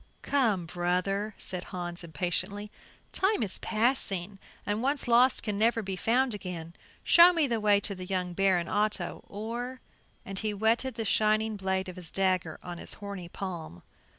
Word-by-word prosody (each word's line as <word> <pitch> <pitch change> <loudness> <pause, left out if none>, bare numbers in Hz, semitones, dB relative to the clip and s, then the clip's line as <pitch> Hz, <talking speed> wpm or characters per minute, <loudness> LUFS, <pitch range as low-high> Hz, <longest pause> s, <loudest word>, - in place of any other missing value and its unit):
"Come, 225 -11 +2
brother!" 180 +5 -1
said 180 -2 -6
Hans, 175 -2 -5
impatiently, 185 +6 -3 0.4
"time 385 - +1
is 195 - -2
passing, 210 -5 0 0.3
and 210 +2 -1
once 275 +1 0
lost 245 +2 +4
can 205 -2 -2
never 225 0 +3
be 190 -1 -3
found 245 +5 +2
again. 175 -5 -6 0.3
Show 345 +1 +8
me 330 -3 +3
the 235 -4 0
way 205 -1 +4
to 200 - -1
the 185 -1 -7
young 180 -2 -1
Baron 185 -2 +2
Otto 210 +3 -1
or 235 +5 -5 0.2
." - - -37
And 195 -1 -1
he 215 -1 -2
whetted 225 +4 +1
the 225 -2 -3
shining 215 +1 +2
blade 190 -1 -1
of 185 - -8
his 175 -3 0
dagger 185 -4 0
on 175 -1 -7
his - - -4
horny 200 -4 -7
palm. 170 - -6
200 Hz, 170 wpm, -29 LUFS, 180-225 Hz, 0.4 s, Show